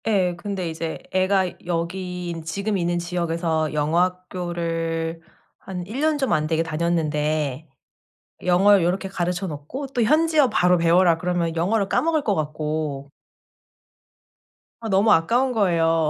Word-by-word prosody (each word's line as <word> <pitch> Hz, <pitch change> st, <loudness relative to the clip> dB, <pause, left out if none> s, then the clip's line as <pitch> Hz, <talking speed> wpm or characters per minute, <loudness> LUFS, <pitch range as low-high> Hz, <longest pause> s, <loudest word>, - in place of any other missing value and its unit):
예. 185 Hz, -5 st, +2 dB
근데 190 Hz, 0 st, -4 dB
이제 160 Hz, 0 st, -4 dB
애가 185 Hz, 0 st, +1 dB
여기 180 Hz, +1 st, -3 dB
있 165 Hz, -1 st, -6 dB
지금 200 Hz, +5 st, -2 dB
있는 175 Hz, -1 st, 0 dB
지역에서 170 Hz, -2 st, -1 dB
영어 150 Hz, +3 st, +1 dB
학교를 170 Hz, -2 st, -2 dB, 0.4 s
한 180 Hz, -2 st, -6 dB
1 220 Hz, +8 st, -6 dB
년 310 Hz, -1 st, +2 dB
좀 270 Hz, -2 st, 0 dB
안 155 Hz, -2 st, +1 dB
되게 160 Hz, 0 st, +1 dB
다녔는데 155 Hz, -3 st, -1 dB, 0.8 s
영어를 185 Hz, +1 st, +5 dB
요렇게 190 Hz, +3 st, -1 dB
가르쳐 180 Hz, 0 st, -2 dB
놓고 155 Hz, -, -6 dB
또 250 Hz, -2 st, -1 dB
현지어 305 Hz, +3 st, +4 dB
바로 180 Hz, -5 st, +3 dB
배워라 170 Hz, 0 st, +4 dB
그러면 170 Hz, -1 st, -1 dB
영어를 195 Hz, +4 st, +1 dB
까먹을 320 Hz, +4 st, +1 dB
것 205 Hz, -7 st, 0 dB
같고. 150 Hz, -2 st, -3 dB, 1.7 s
아 225 Hz, -, -3 dB
너무 200 Hz, +2 st, +4 dB
아까운 240 Hz, +11 st, +2 dB
거예요. 165 Hz, -7 st, +2 dB
175 Hz, 275 characters per minute, -23 LUFS, 165-195 Hz, 1.7 s, 영어를